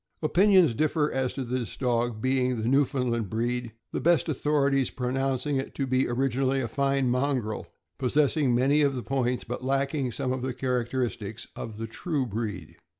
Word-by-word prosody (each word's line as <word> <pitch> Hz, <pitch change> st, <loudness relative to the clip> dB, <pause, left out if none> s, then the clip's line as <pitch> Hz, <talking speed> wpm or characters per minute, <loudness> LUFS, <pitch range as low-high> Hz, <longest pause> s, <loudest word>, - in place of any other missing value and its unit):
Opinions 180 Hz, -, +5 dB
differ 150 Hz, +3 st, +1 dB
as 130 Hz, -1 st, 0 dB
to 135 Hz, -, -2 dB
this 125 Hz, -1 st, -3 dB
dog 120 Hz, -3 st, 0 dB
being 130 Hz, -1 st, +2 dB
of 110 Hz, -3 st, -3 dB
the -, -, -1 dB
Newfoundland 125 Hz, -5 st, +1 dB
breed, 120 Hz, +1 st, -2 dB, 0.2 s
the -, -, -2 dB
best 170 Hz, -4 st, +3 dB
authorities 140 Hz, -3 st, +1 dB
pronouncing 135 Hz, +2 st, -1 dB
it 135 Hz, -, -4 dB
to 140 Hz, -, -1 dB
be 130 Hz, 0 st, +1 dB
originally 130 Hz, +2 st, +1 dB
a 125 Hz, -, -1 dB
fine 135 Hz, +2 st, +1 dB
mongrel, 125 Hz, -3 st, -1 dB, 0.3 s
possessing 140 Hz, 0 st, +2 dB
many 140 Hz, +5 st, +3 dB
of 140 Hz, -2 st, +2 dB
the 125 Hz, -, -4 dB
points, 125 Hz, -2 st, -1 dB
but 120 Hz, +2 st, -5 dB
lacking 135 Hz, 0 st, 0 dB
some 125 Hz, +3 st, -2 dB
of 130 Hz, -, -3 dB
the 130 Hz, -1 st, -3 dB
characteristics, 120 Hz, -4 st, -2 dB
of 110 Hz, -2 st, -7 dB
the 115 Hz, -, -4 dB
true 140 Hz, +4 st, -2 dB
breed. 105 Hz, -7 st, -5 dB
130 Hz, 170 wpm, -27 LUFS, 120-140 Hz, 0.3 s, Opinions